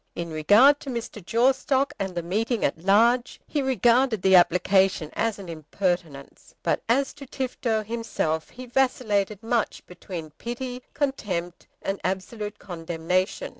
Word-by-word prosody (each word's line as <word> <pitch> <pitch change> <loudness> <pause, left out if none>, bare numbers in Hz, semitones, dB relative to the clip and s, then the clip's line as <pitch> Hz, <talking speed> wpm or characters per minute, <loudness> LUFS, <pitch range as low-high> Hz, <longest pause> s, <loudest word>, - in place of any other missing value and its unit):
In 170 -1 -4
regard 210 - +5
to 280 - -8
Mr. 230 -4 -5
Jawstock 260 +6 +2
and 190 -2 -3
the 175 - -2
meeting 220 +6 0
at - - -1
large, 235 +6 +3
he 295 - -1
regarded 245 -3 +2
the 190 - +4
application 180 -1 +3
as 225 -2 -1
an 195 -2 -9
impertinence. 165 -2 -4
But - - +1
as 270 +4 +2
to 280 -2 -11
Tifto 240 -4 -2
himself 210 -8 -2
he 255 +1 -10
vacillated 220 -5 0
much 230 -1 -1
between 175 -3 -8
pity, 245 +1 -5
contempt, 195 - -3 0.2
and 195 0 -3
absolute 205 +3 -3
condemnation. 175 - -2
210 Hz, 135 wpm, -25 LUFS, 180-245 Hz, 0.2 s, regard